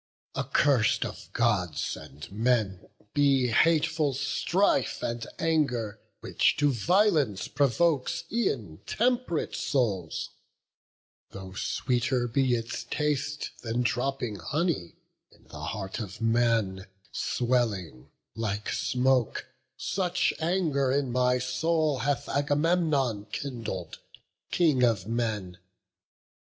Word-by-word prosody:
Accurs'd 135 Hz, -6 st, +2 dB
of -, -, -8 dB
Gods 95 Hz, -10 st, 0 dB
and 75 Hz, +6 st, -11 dB
men 110 Hz, -3 st, 0 dB, 0.2 s
be 135 Hz, -3 st, +3 dB
hateful 155 Hz, +1 st, +3 dB
strife 145 Hz, +2 st, +1 dB
And 115 Hz, 0 st, -3 dB
anger, 125 Hz, -10 st, 0 dB, 0.2 s
which -, -, +2 dB
to 145 Hz, 0 st, +3 dB
violence 150 Hz, -, +2 dB
provokes 145 Hz, +3 st, +1 dB
E'en 120 Hz, -, -1 dB
temp'rate 245 Hz, -8 st, 0 dB
souls: 100 Hz, -, -1 dB, 1.0 s
though 95 Hz, -1 st, -9 dB
sweeter 125 Hz, +4 st, 0 dB
be 125 Hz, +1 st, +2 dB
its 115 Hz, +1 st, -4 dB
taste 150 Hz, +2 st, -1 dB
Than 120 Hz, +1 st, -1 dB
dropping 125 Hz, -3 st, -1 dB
honey, 140 Hz, -, -1 dB, 0.4 s
in -, -, -23 dB
the 75 Hz, 0 st, -7 dB
heart 95 Hz, +2 st, -4 dB
of 105 Hz, -2 st, -6 dB
man 115 Hz, -5 st, +1 dB, 0.2 s
Swelling, 110 Hz, -, -1 dB, 0.2 s
like 105 Hz, -2 st, -3 dB
smoke; 125 Hz, -2 st, +1 dB, 0.3 s
such 180 Hz, -2 st, 0 dB
anger 160 Hz, -6 st, +1 dB
in 135 Hz, -2 st, 0 dB
my 125 Hz, 0 st, +3 dB
soul 150 Hz, +3 st, 0 dB
Hath 135 Hz, +2 st, -1 dB
Agamemnon 145 Hz, -, +1 dB
kindled, 115 Hz, -, -5 dB, 0.5 s
King 155 Hz, -7 st, +3 dB
of 115 Hz, -7 st, +3 dB
men. 105 Hz, -5 st, -2 dB
125 Hz, 100 wpm, -28 LUFS, 110-145 Hz, 1.0 s, be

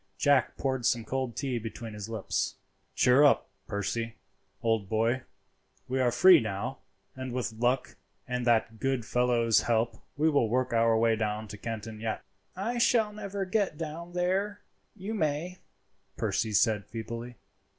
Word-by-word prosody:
Jack 145 Hz, +7 st, +3 dB
poured 130 Hz, -2 st, -1 dB
some 120 Hz, -1 st, +1 dB
cold 130 Hz, -3 st, -2 dB
tea 130 Hz, -2 st, -2 dB
between 115 Hz, 0 st, -7 dB
his 105 Hz, +1 st, -7 dB
lips. 110 Hz, -3 st, -2 dB, 0.4 s
"Cheer 125 Hz, +3 st, +5 dB
up, 145 Hz, -, +4 dB, 0.2 s
Percy, 110 Hz, +3 st, -2 dB, 0.5 s
old 115 Hz, -4 st, +1 dB
boy, 115 Hz, +4 st, +1 dB, 0.7 s
we 130 Hz, +1 st, 0 dB
are 125 Hz, -1 st, +3 dB
free 185 Hz, +8 st, +8 dB
now, 100 Hz, -3 st, -3 dB, 0.4 s
and 130 Hz, -1 st, -5 dB
with 120 Hz, -2 st, -2 dB
luck 125 Hz, +3 st, 0 dB, 0.3 s
and 125 Hz, -1 st, -2 dB
that 115 Hz, -1 st, +2 dB
good 135 Hz, -1 st, 0 dB
fellow's 120 Hz, -1 st, +3 dB
help 115 Hz, -1 st, 0 dB, 0.2 s
we 155 Hz, +2 st, +3 dB
will 140 Hz, -8 st, +3 dB
work 125 Hz, +1 st, 0 dB
our 115 Hz, -1 st, +4 dB
way 115 Hz, 0 st, +3 dB
down 110 Hz, 0 st, -2 dB
to 105 Hz, -, -7 dB
Canton 110 Hz, 0 st, -6 dB
yet." 110 Hz, 0 st, -3 dB, 0.3 s
"I 230 Hz, +6 st, -2 dB
shall 225 Hz, -3 st, +3 dB
never 200 Hz, -2 st, -4 dB
get 190 Hz, -4 st, 0 dB
down 165 Hz, +2 st, -6 dB
there; 195 Hz, +3 st, -1 dB, 0.3 s
you 205 Hz, +2 st, -5 dB
may," 165 Hz, 0 st, -1 dB, 0.6 s
Percy 110 Hz, -, 0 dB
said 105 Hz, 0 st, +2 dB
feebly. 115 Hz, +2 st, -6 dB
120 Hz, 150 wpm, -29 LUFS, 115-150 Hz, 0.7 s, free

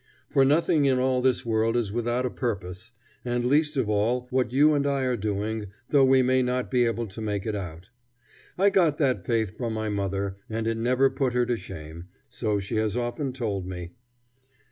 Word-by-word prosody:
For 135 Hz, -, +4 dB
nothing 150 Hz, +1 st, +3 dB
in 130 Hz, -2 st, +3 dB
all 130 Hz, 0 st, +1 dB
this 130 Hz, -2 st, +1 dB
world 115 Hz, +1 st, +1 dB
is 110 Hz, -5 st, -1 dB
without 120 Hz, +2 st, 0 dB
a 125 Hz, -, -2 dB
purpose, 95 Hz, -7 st, -4 dB, 0.3 s
and 120 Hz, 0 st, -1 dB
least 150 Hz, +3 st, +2 dB
of 130 Hz, -5 st, +1 dB
all 110 Hz, +4 st, +1 dB
what 125 Hz, -2 st, +1 dB
you 150 Hz, +4 st, +5 dB
and 145 Hz, -1 st, +1 dB
I 140 Hz, -1 st, 0 dB
are 125 Hz, -1 st, +1 dB
doing, 105 Hz, 0 st, -2 dB, 0.2 s
though 140 Hz, -2 st, +5 dB
we 130 Hz, 0 st, +5 dB
may 130 Hz, +1 st, +3 dB
not 125 Hz, 0 st, -1 dB
be 125 Hz, -2 st, +3 dB
able 115 Hz, 0 st, -1 dB
to 105 Hz, +1 st, -9 dB
make 105 Hz, -3 st, -2 dB
it 110 Hz, -, -2 dB
out. 90 Hz, +1 st, -7 dB, 0.7 s
I 200 Hz, +2 st, +4 dB
got 170 Hz, -7 st, +3 dB
that 130 Hz, -, 0 dB
faith 110 Hz, -5 st, 0 dB
from 115 Hz, -3 st, -3 dB
my 110 Hz, 0 st, -2 dB
mother, 100 Hz, -1 st, -2 dB
and 110 Hz, 0 st, -2 dB
it 115 Hz, 0 st, 0 dB
never 125 Hz, +3 st, +2 dB
put 130 Hz, -3 st, -1 dB
her 125 Hz, 0 st, +2 dB
to 120 Hz, -, 0 dB
shame, 85 Hz, -4 st, -9 dB, 0.2 s
so 105 Hz, -3 st, -1 dB
she 100 Hz, +3 st, -3 dB
has 110 Hz, 0 st, 0 dB
often 125 Hz, +3 st, -2 dB
told 105 Hz, -8 st, -3 dB
me. 90 Hz, -2 st, -6 dB
120 Hz, 205 wpm, -26 LUFS, 105-130 Hz, 0.7 s, you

